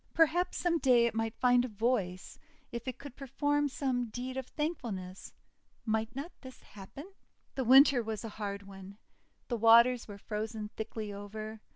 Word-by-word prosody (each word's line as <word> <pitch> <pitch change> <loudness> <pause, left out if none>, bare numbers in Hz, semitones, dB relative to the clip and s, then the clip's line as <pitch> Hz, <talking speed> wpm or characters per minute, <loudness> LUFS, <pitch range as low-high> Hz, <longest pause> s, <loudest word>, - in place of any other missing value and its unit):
Perhaps 330 +2 +2
some 340 -2 +1
day 245 -4 +4
it 235 - 0
might 225 0 -2
find 245 -1 +4
a - - -2
voice, 210 -5 -2 0.3
if 235 +1 -6
it 255 - -4
could 280 -3 -11
perform 290 +2 0
some 255 -3 -1
deed 250 +3 -6
of 265 -1 -4
thankfulness! 225 - -5 0.5
Might 220 +1 -1
not 290 +6 -5
this 260 -2 -12
happen? 270 - -11 0.4
The 265 - -2
Winter 265 +1 +7
was 220 -1 -5
a 225 - -5
hard 200 -1 -5
one. 195 0 -12 0.5
The 240 - -2
waters 235 +2 +6
were 205 -2 -9
frozen 215 +1 -5
thickly 215 -1 -6
over. 215 +2 -7
235 Hz, 165 wpm, -31 LUFS, 215-265 Hz, 0.5 s, Winter